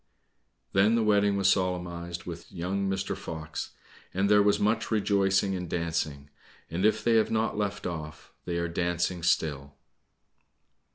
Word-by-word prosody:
Then 105 +4 +4
the 115 - +2
wedding 100 -1 +3
was 100 -1 +2
solemnized 90 -2 -1
with 85 -1 -8
young 95 +3 -2
Mr. 95 0 -2
Fox, 80 -1 -6 0.4
and 100 +2 +2
there 105 0 +7
was 100 0 +3
much 110 +2 +1
rejoicing 100 -2 +2
and 90 -2 -5
dancing; 80 -4 -2 0.4
and 90 +5 0
if 110 0 0
they 115 0 +4
have 110 - +3
not 110 0 0
left 105 0 -2
off, 80 -3 -6
they 85 - -2
are 85 0 0
dancing 85 +1 -1
still. 70 -5 0
90 Hz, 150 wpm, -28 LUFS, 85-100 Hz, 0.4 s, there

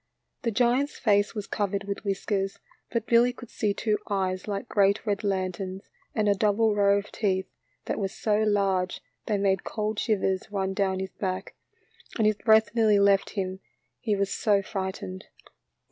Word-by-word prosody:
The 235 - 0
giant's 245 +5 +1
face 205 -1 +2
was 210 -2 -3
covered 200 -1 -2
with 200 0 -5
whiskers, 195 -1 -1 0.3
but 230 -2 -1
Billy 240 +1 +4
could 245 -1 -12
see 210 - 0
two 210 +1 0
eyes 190 -1 -1
like 200 +2 -3
great 200 +1 +2
red 205 0 -1
lanterns, 190 -1 -3 0.2
and 215 -1 +1
a 205 - +5
double 210 +2 +2
row 200 -1 +4
of 200 +1 -5
teeth 190 -3 0 0.4
that - - -2
were 195 - 0
so 210 +2 0
large 195 -4 +1 0.3
they 210 - +1
made 195 -1 +1
cold 215 -1 -2
shivers 195 -3 0
run 195 -1 -1
down 190 -1 0
his 190 - -5
back, 185 -2 -3 0.6
and 220 - +2
his 215 -1 +3
breath 220 -1 +4
nearly 220 -3 +4
left 200 -1 +4
him 190 -1 -2 0.4
he 215 -4 0
was 200 0 -1
so 205 -4 +2
frightened. 190 -1 -5
200 Hz, 170 wpm, -27 LUFS, 195-215 Hz, 0.6 s, a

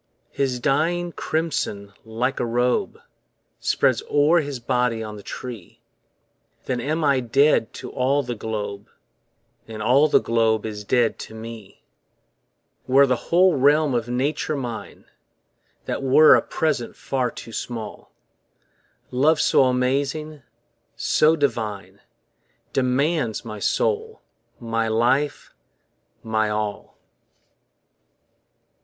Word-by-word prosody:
His 130 -3 -1
dying 165 +6 0
crimson 145 -13 -3
like 120 +4 -2
a - - 0
robe 120 +1 0 0.6
Spreads - - +1
o'er 150 +4 +4
his 145 -4 -4
body 125 -2 0
on 105 -1 -7
the 105 - -10
tree, 115 -3 -9 0.9
Then 125 -2 -2
am 155 +5 -1
I 140 -3 +3
dead 130 0 +2
to - - -8
all 140 +2 +1
the 125 -1 -4
globe, 105 -2 -5 0.8
And 110 -1 -8
all 135 +7 +4
the - - +4
globe 110 -2 +1
is 105 -1 -5
dead 120 +1 +1
to 110 - -9
me. 110 -2 -10 1.0
Were 135 +2 +6
the 125 -3 -2
whole 180 0 +4
realm 145 +1 +3
of 120 -1 -1
Nature 145 +5 -1
mine, 120 -4 -7 0.8
That - - -3
were 135 +4 +6
a - - +5
present 155 -7 -2
far 130 -3 -2
too 115 - -10
small: 115 -3 -6 1.0
Love 150 +5 +3
so 135 - +4
amazing, 140 +4 -1 0.5
so 155 +1 +3
divine 110 - -3 0.7
Demands 135 -1 0
my 110 -2 -7
soul, 450 - -1 0.4
my 115 -1 -1
life, 125 +6 0 0.7
my 110 -1 0
all. 105 -1 -4
125 Hz, 115 wpm, -23 LUFS, 115-145 Hz, 1.0 s, Were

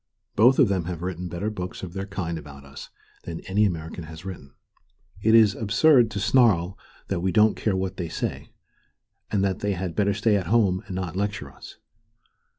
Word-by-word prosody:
Both 125 +5 +5
of 135 - +5
them 95 -4 -1
have 90 -1 -5
written 90 -1 -4
better 90 +6 -3
books 90 -3 -6
of 90 -2 -6
their 95 0 -5
kind 90 -4 -4
about 70 -2 -12
us 70 +1 -10 0.4
than 85 -1 -6
any 105 +3 +1
American 80 -2 -4
has 80 +3 -11
written. 70 -8 -9 0.7
It 110 +1 +4
is 110 -3 +6
absurd 120 +4 +4
to 105 -2 -4
snarl 100 -6 +3 0.3
that 95 - -1
we 95 +2 0
don't 110 +1 +4
care 105 -3 -1
what 95 0 -3
they 85 -3 -4
say, - - -4 0.8
and 100 -2 0
that 95 -2 0
they 105 -1 -1
had 90 -2 -4
better 100 -1 +1
stay 105 +1 +2
at 90 -4 -3
home 100 -3 +2
and 95 - -6
not 90 -2 -4
lecture 100 +1 -3
us. - - -13
95 Hz, 195 wpm, -25 LUFS, 85-105 Hz, 0.8 s, is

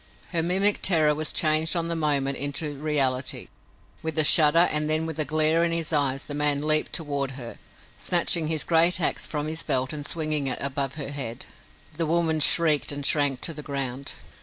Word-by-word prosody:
Her 170 -2 0
mimic 190 +5 +2
terror 155 -5 +2
was 155 +1 -3
changed 155 +2 +2
on 170 -1 -2
the 170 - -3
moment 140 -4 0
into 145 +2 -3
reality. 135 -3 -1 0.5
With 160 -1 -5
a 155 - +6
shudder 160 +3 +6
and 150 0 -1
then 155 +1 +2
with 160 -1 -7
a 155 - +2
glare 155 +2 +1
in 170 - 0
his 165 -1 -3
eyes 140 -2 +1
the 145 - -9
man 145 -1 0
leaped 155 0 +2
toward 140 -4 -3
her, 120 -3 -9 0.4
snatching 170 -2 +1
his 155 -1 0
great 170 +2 +3
ax 165 - -1
from 150 -1 -4
his 160 +1 -3
belt 130 +2 -1
and 150 -1 -6
swinging 155 -2 -1
it 130 - 0
above 140 0 -3
her 145 -3 -6
head. 130 -5 -6 0.5
The 165 -2 -2
woman 160 -1 0
shrieked 155 -1 +3
and 145 -1 -5
shrank 140 -3 +1
to 165 - -3
the 150 - -8
ground. 140 -2 -5
150 Hz, 195 wpm, -24 LUFS, 140-160 Hz, 0.5 s, a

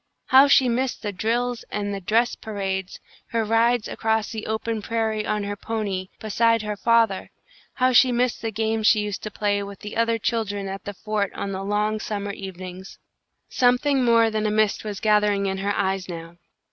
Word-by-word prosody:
How 270 +2 +8
she 265 -2 +5
missed 245 +1 -1
the 205 - -2
drills 235 +4 -1
and 205 -1 -3
the 195 - -4
dress 230 +6 +2
parades; 195 -3 -4 0.3
her 230 -1 -1
rides 230 +1 +2
across 220 -1 -1
the 220 -1 -5
open 220 0 -2
prairie 220 -1 -1
on 210 -1 -1
her 205 0 -3
pony, 200 -3 -3
beside 230 +1 +2
her 210 0 -3
father; 230 -2 +2 0.5
how 255 0 +2
she 255 +1 +6
missed 245 0 0
the 225 - -2
games 220 0 0
she 215 - +5
used 210 -1 -4
to 215 - -5
play 205 0 0
with 200 0 -8
the 210 +1 -7
other 230 0 +2
children 205 -3 -2
at 195 0 -6
the 205 - -6
fort 210 -1 -2
on 200 - -3
the 190 0 -4
long 210 +2 0
summer 205 -1 -3
evenings! 185 -1 -8 0.5
Something 255 +2 +2
more 230 -2 +4
than 215 0 0
a - - 0
mist 215 -1 +1
was 205 -2 -5
gathering 210 -2 +2
in 190 0 -2
her 200 +1 -1
eyes 190 -1 -1
now. 165 0 -8
215 Hz, 190 wpm, -24 LUFS, 200-230 Hz, 0.5 s, How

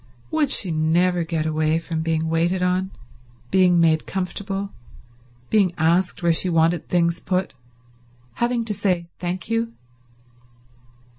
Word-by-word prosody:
Would 310 -3 +1
she 195 -9 0
never 170 +3 +2
get 160 -1 -2
away 155 0 +1
from 165 -1 -3
being 160 0 -1
waited 170 +3 +1
on, 185 +1 +1 0.6
being 180 -2 +4
made 160 -2 +3
comfortable, 195 +1 -3 0.8
being 195 -5 +3
asked 175 +3 +1
where 170 -1 +4
she 180 +3 +2
wanted 165 0 +1
things 170 -1 +1
put, 185 0 -2 0.9
having 235 -1 +1
to 215 - -2
say 180 -4 -1
thank 175 0 -4
you? 230 +1 -1
175 Hz, 130 wpm, -22 LUFS, 165-190 Hz, 0.9 s, being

